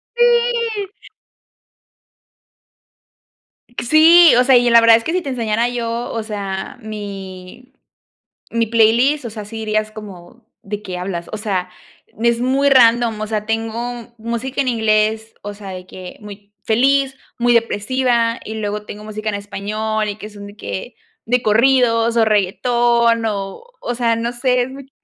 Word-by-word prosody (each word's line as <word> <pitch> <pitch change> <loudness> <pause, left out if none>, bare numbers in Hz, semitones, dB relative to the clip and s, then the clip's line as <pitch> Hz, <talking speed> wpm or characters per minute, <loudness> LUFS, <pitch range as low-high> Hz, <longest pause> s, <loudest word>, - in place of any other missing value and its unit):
¡Sí! 475 -3 +1 2.9
Sí, 320 +3 +7
o 250 - +5
sea, 260 -1 +5
y 240 0 +3
la 235 0 +7
verdad 230 0 +7
es 230 - -6
que 325 - -2
si 365 - 0
te 280 - -6
enseñara 230 -2 0
yo, 235 0 -3
o 225 -1 -3
sea, 200 -2 -5
mi 200 +1 -9 0.8
mi 230 0 0
playlist, 235 +6 +3
o 235 - -5
sea, 215 -1 -7
si 225 +2 -10
dirías 215 -1 -1
como: 210 0 -12 0.2
"¿De 205 +1 -5
qué 185 -3 -6
hablas?" 180 -2 -5
O 215 - -3
sea, 195 -4 -2 0.5
n 230 +3 +1
es 235 0 0
muy 270 +3 +2
random, 235 -3 +4
o 215 - -2
sea, 215 -1 -3
tengo 225 +1 -2 0.4
música 235 +4 -3
en 265 - 0
inglés, 220 -1 0
o 205 0 -6
sea, 200 -1 -9
de 185 -1 -8
que 185 -1 -10
muy 205 -1 -12
feliz, 270 +4 +2 0.2
muy 240 0 +3
depresiva, 235 +1 +1
y 220 - -6
luego 210 -1 -4
tengo 210 0 -9
música 215 0 -6
en 210 - -1
español, 210 +2 -3
y 205 - -4
que 215 0 -9
son 205 -1 -11
de 205 +1 -13
que 230 +3 -6 0.3
de 245 +2 +1
corridos, 230 0 +3
o, 225 - +5
reguetón, 235 +3 +2
o 200 - -4 0.2
o, 245 - -3
sea, 235 -1 +1
no 230 +1 -2
sé, 250 0 +1
es 250 - -4
muy 275 +1 -10
d 265 - -27
225 Hz, 165 wpm, -18 LUFS, 210-245 Hz, 2.9 s, Sí